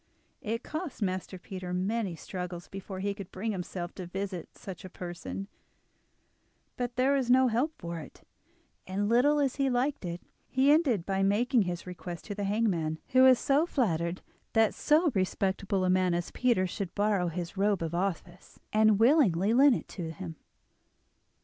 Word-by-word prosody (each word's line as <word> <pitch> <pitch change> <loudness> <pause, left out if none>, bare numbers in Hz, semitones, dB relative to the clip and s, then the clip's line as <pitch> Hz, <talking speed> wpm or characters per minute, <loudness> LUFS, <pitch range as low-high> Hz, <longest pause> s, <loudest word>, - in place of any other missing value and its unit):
It 225 +2 -3
cost 310 - -4
Master 185 0 -3
Peter 180 0 -6
many 195 0 -1
struggles 180 +1 -6
before 195 -1 -7
he 200 +1 -1
could 200 -3 -9
bring 215 +4 -3
himself 180 -2 -5
to 185 -2 -7
visit 185 -1 -5
such 190 -4 -8
a 185 - -8
person, 180 +2 -6 1.3
but 245 -1 -3
there 260 +3 +3
was 265 -3 0
no 255 0 +5
help 245 +8 +1
for 170 0 -5
it, 150 - -12 0.6
and, 200 +2 -1
little 250 +7 +4
as 275 -2 0
he 275 -1 +2
liked 260 +2 0
it, 175 -1 -4 0.3
he 265 +2 +4
ended 270 - +3
by 195 -1 0
making 230 +6 +3
his 175 -1 -4
request 175 -1 -7
to 205 - -4
the 205 0 -3
hangman, 195 -7 0
who 255 -1 +5
was 260 -1 +6 0.2
flattered 170 - 0 0.3
that 225 -1 +4
so 310 +1 +3
respectable 190 0 0
a - - +2
man 185 -1 +2
as 175 0 -3
Peter 240 -7 +2
should 185 0 -5
borrow 205 -3 +2
his 170 +1 -4
robe 200 -2 +1
of 165 0 -3
office, 175 0 -4
and 215 -1 +5
willingly 225 - +4
lent 270 +1 +6
it - - -6
to 170 -4 -5
him. 90 - -7
195 Hz, 170 wpm, -29 LUFS, 180-240 Hz, 1.3 s, was